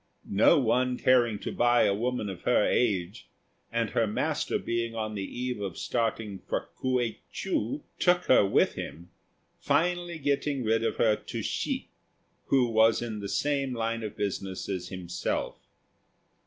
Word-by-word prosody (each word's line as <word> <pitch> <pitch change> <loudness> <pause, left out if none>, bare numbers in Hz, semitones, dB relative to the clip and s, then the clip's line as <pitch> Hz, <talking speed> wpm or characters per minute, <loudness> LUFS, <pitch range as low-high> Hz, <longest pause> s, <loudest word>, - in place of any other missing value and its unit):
No 100 +2 +5
one 125 0 +2
caring 120 -4 +3
to - - -4
buy 120 0 +3
a 100 - +3
woman 120 +1 -1
of 95 -3 -6
her 125 -4 +3
age, 100 -3 0 0.4
and 115 -1 0
her 115 - +2
master 105 - -1
being 115 0 -2
on 110 -1 -3
the 100 - -4
eve 125 +2 -4
of 95 -4 -4
starting 110 -4 -2
for - - -4
K'uei 125 -4 0
chou, 120 +7 -2 0.2
took 180 0 +3
her 130 - +5
with 95 - +3
him, 85 +3 -8 0.5
finally 175 0 0
getting 140 -2 0
rid 115 0 +2
of - - 0
her 110 -2 +3
to - - -6
Hsi, - - -2 0.6
who 135 -2 +4
was 110 +1 +4
in 110 -3 -4
the 100 -1 -5
same 140 0 0
line 115 0 -1
of 110 -2 -6
business 95 -2 -3
as 95 -3 -3
himself. 90 -2 -3
115 Hz, 155 wpm, -28 LUFS, 105-125 Hz, 0.6 s, No